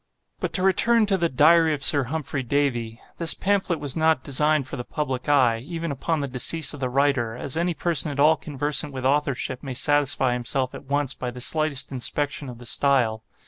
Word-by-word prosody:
But - - -3
to 185 - +2
return 220 +4 +3
to 200 -1 +1
the 170 -3 0
'Diary' 160 +3 +4
of 140 - -7
Sir 140 -1 +4
Humphrey 145 0 -4
Davy. 120 -4 -2 0.2
This 170 -1 +4
pamphlet 190 -4 -1
was 145 -3 -2
not 160 -4 +1
designed 150 +1 +1
for 130 - -6
the 120 - -5
public 135 -1 -4
eye, 125 -6 +3
even 165 +5 -5
upon 150 +3 -2
the 140 - -3
decease 135 +4 +1
of 145 - -9
the 130 -1 -2
writer, 130 -4 0
as 130 +3 -4
any 170 +1 -1
person 160 -4 +1
at 140 -1 -6
all 155 +3 +5
conversant 145 -1 -1
with 130 -1 -5
authorship 135 -2 -1
may 135 -3 -6
satisfy 140 -2 +2
himself 125 +2 -1
at - - -10
once 145 0 -1
by 125 - -5
the 125 +1 -9
slightest 155 +1 -1
inspection 140 +2 -3
of 120 - -10
the 120 - -13
style. 120 -4 +1
140 Hz, 205 wpm, -23 LUFS, 130-155 Hz, 0.2 s, all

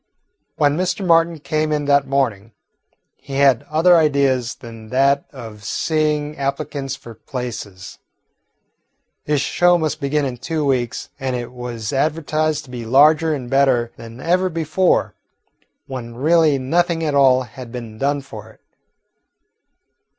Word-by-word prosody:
When 145 -1 +2
Mr. 185 +2 -1
Martin 165 -1 +3
came 155 +1 -1
in 150 -1 0
that 140 -1 +3
morning, 115 -6 -1 0.6
he 135 - -11
had 135 -3 +4
other 170 +3 +5
ideas 140 -6 +1
than 115 -2 -12
that 140 +3 +2
of 110 -6 -10
seeing 150 - -1
applicants 140 -1 -3
for 120 -4 -12
places. 110 -6 -7 1.3
His 150 -2 +1
show 175 +3 +3
must 155 -3 -2
begin 145 +1 0
in 125 -2 -4
two 155 +4 -2
weeks, 125 -3 -1
and 130 -1 -2
it 120 -1 -5
was 120 -2 -6
advertised 155 +1 0
to 130 - -14
be 120 -2 -6
larger 150 +6 +4
and 130 -4 -6
better 130 -3 +2
than 115 +1 -11
ever 180 +5 +1
before, 165 +2 +1 0.7
when 120 -3 -7
really 155 +2 +3
nothing 165 +5 0
at 150 -2 -1
all 130 -2 +4
had 125 0 -11
been 115 -3 -8
done 140 +1 0
for 110 -6 -11
it. 110 - -20
140 Hz, 140 wpm, -20 LUFS, 125-155 Hz, 1.3 s, other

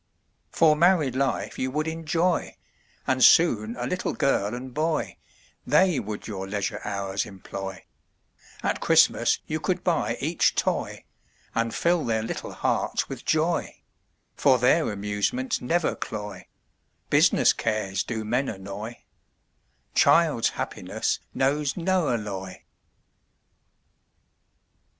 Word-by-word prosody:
For 155 -2 +4
married 160 -6 +3
life 135 -1 -1
you 130 - -1
would 155 +4 -2
enjoy, 165 +2 -1 0.5
And 130 -1 +1
soon 115 -9 +5
a 125 0 -4
little 180 +8 -2
girl 110 -5 0
and 125 +1 -8
boy, 155 +1 -1 0.5
They 150 +3 +3
would 105 0 -6
your 95 -3 -5
leisure 100 0 -3
hours 100 -1 -2
employ, 95 0 -8 0.8
At - - 0
Christmas - - +4
you - - -3
could - - -2
buy - - 0
each - - +1
toy, - - -2 0.5
And 115 0 0
fill 170 +6 +1
their 110 -1 0
little 115 - -5
hearts - - -1
with - - -7
joy, 160 +2 0 0.5
For 135 -3 +4
their 125 +4 +3
amusements 105 - -2
never 165 +6 0
cloy, 105 -2 -6 0.6
Business - - +5
cares 105 -4 -1
do 110 -2 -4
men 125 +5 0
annoy, 100 +4 -7 0.9
Child's 155 -9 +4
happiness - - -2 0.2
knows 140 +2 0
no 180 -3 +1
alloy. 100 -5 -4
125 Hz, 115 wpm, -25 LUFS, 105-160 Hz, 0.9 s, soon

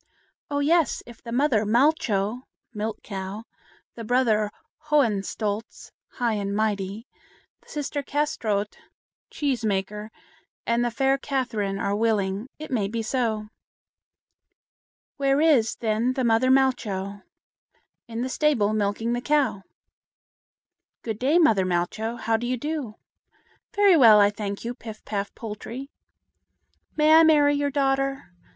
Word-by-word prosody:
"Oh, 285 - -2
yes! 320 0 +2
if 235 -1 -14
the 235 - -8
mother 245 -3 +2
Malcho 230 -2 +1 0.3
(Milk 215 0 -4
Cow), 195 +1 -6 0.5
the 230 - -8
brother 220 -3 +2 0.4
Hohenstolz 215 -5 -1 0.2
(High 240 -3 0
and 200 -1 -2
Mighty), 210 0 -2 0.6
the - - -24
sister 290 -1 -3
Kâsetraut 230 -8 -1 0.6
(Cheese 270 -5 -2
maker), 210 +1 -2 0.6
and 235 +1 +1
the 240 - +1
fair 270 +3 +1
Catherine 230 -9 -2
are 200 0 -1
willing, 210 0 0
it 310 -1 -9
may 215 -6 0
be 225 +2 -3
so." 220 -3 -1 1.7
"Where 275 0 +2
is, 290 -8 +3
then, 225 +3 0
the 260 -1 -1
mother 235 +2 +3
Malcho?" 205 -7 +1 0.9
"In 230 +1 -4
the - - -1
stable, 255 -8 +1
milking 215 +2 -1
the 240 - -2
cow." 275 -7 +1 1.4
"Good 220 -2 -4
day, 280 +6 +3
mother 265 - +4
Malcho. 185 +6 -2
How 225 0 +1
do 240 +2 -4
you 255 +1 -1
do?" 290 -5 -4 0.8
"Very 405 -3 +6
well, 225 -8 +8
I 205 0 +5
thank 205 0 -5
you, 240 - -2
Pif 220 -3 -11
paf 200 -1 -3
Poltrie." 230 +5 -7 1.1
"May 305 +1 +5
I 320 - +9
marry 295 -3 +5
your 285 0 0
daughter?" 275 -5 -1
230 Hz, 130 wpm, -25 LUFS, 210-275 Hz, 1.7 s, I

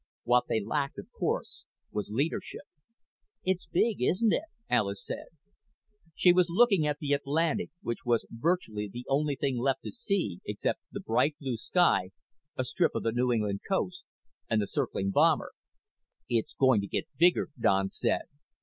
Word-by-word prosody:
What 120 +1 +3
they 110 - +2
lacked, 140 +7 -2
of - - -9
course, - - -3 0.3
was 105 -1 -3
leadership. 140 - -2 0.8
"It's 185 -2 -1
big, 205 - +1
isn't 200 - +3
it?" 320 - 0 0.2
Alis 100 -2 0
said. - - -5 0.9
She 180 - +6
was 180 -1 +3
looking 195 -4 +4
at 145 0 0
the 145 -1 -1
Atlantic, 150 +3 0
which 120 - -3
was 120 -1 +1
virtually 115 - -1
the 120 +3 -7
only 145 +1 +1
thing 135 -2 -1
left 135 +2 0
to - - -5
see 200 - -1
except - - -2
the - - -5
bright 140 +6 +1
blue 130 -4 -2
sky, 170 - +2 0.5
a 130 - +1
strip 120 - +1
of - - -1
the 115 - +1
New 125 +2 +1
England 105 -4 0
coast, 185 -2 -1 0.5
and 110 - +2
the 105 - +1
circling 100 0 -1
bomber. - - +3 0.8
"It's 115 -2 -1
going 130 -6 +4
to 100 - -5
get 150 - -2
bigger," 175 +1 +4
Don 95 -3 +3
said. - - 0
135 Hz, 165 wpm, -29 LUFS, 110-170 Hz, 0.9 s, She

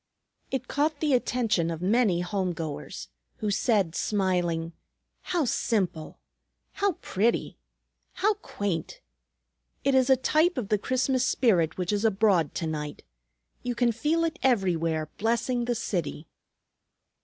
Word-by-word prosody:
It 260 -1 -3
caught 295 +1 0
the 300 -3 +1
attention 230 -9 +1
of 165 -1 -3
many 195 -1 +2
home 185 0 -1
goers, 160 -3 -6 0.3
who 210 - -2
said, 200 -5 +2
smiling, 175 -5 0 0.5
"How 350 -5 0
simple! 190 -9 -1 0.5
How 400 -1 0
pretty! 220 +5 0 0.5
How 425 +2 +2
quaint! 205 - -4 0.8
It 275 - +2
is 260 0 +4
a 265 - +6
type 310 +6 +2
of 220 -5 -3
the 210 -2 +2
Christmas 255 +2 +1
spirit 175 - +2
which 180 +2 -1
is 205 +1 0
abroad 195 -7 +2
to 165 - -2
night. 150 -2 -4 0.6
You 245 -1 -3
can 240 0 +3
feel 305 +8 0
it 330 +1 -2
everywhere, 165 - +1
blessing 235 +2 0
the 240 0 0
city." 170 -7 -3
215 Hz, 130 wpm, -27 LUFS, 175-255 Hz, 0.8 s, a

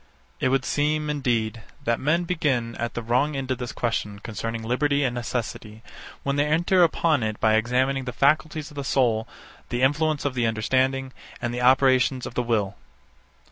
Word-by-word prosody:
72. - - -1
It - - +2
would 135 0 +1
seem, 150 +1 0
indeed, 115 -6 -1 0.2
that 115 0 0
men 155 +5 +1
begin 140 -10 0
at 120 0 -3
the 120 - -3
wrong 130 +6 +1
end 135 -1 -3
of 130 - -1
this 125 -1 -4
question 105 -3 -2
concerning 115 +2 -5
liberty 140 +5 +1
and 125 -3 0
necessity, 115 -2 -5 0.4
when 140 0 -1
they 145 - +3
enter 175 +4 +3
upon 160 -3 +3
it 110 -1 -2
by 110 -1 +3
examining 125 +4 +1
the 125 - -3
faculties 150 +3 +1
of - - -14
the 140 - -4
soul, 120 -5 +1 0.4
the 120 +1 -1
influence 150 +2 +1
of 140 - 0
the 120 -2 +1
understanding, 130 +4 0 0.3
and 120 -1 -3
the 125 - -3
operations 130 0 +4
of - - -7
the 125 - 0
will. 110 -5 0
130 Hz, 185 wpm, -24 LUFS, 115-145 Hz, 0.4 s, operations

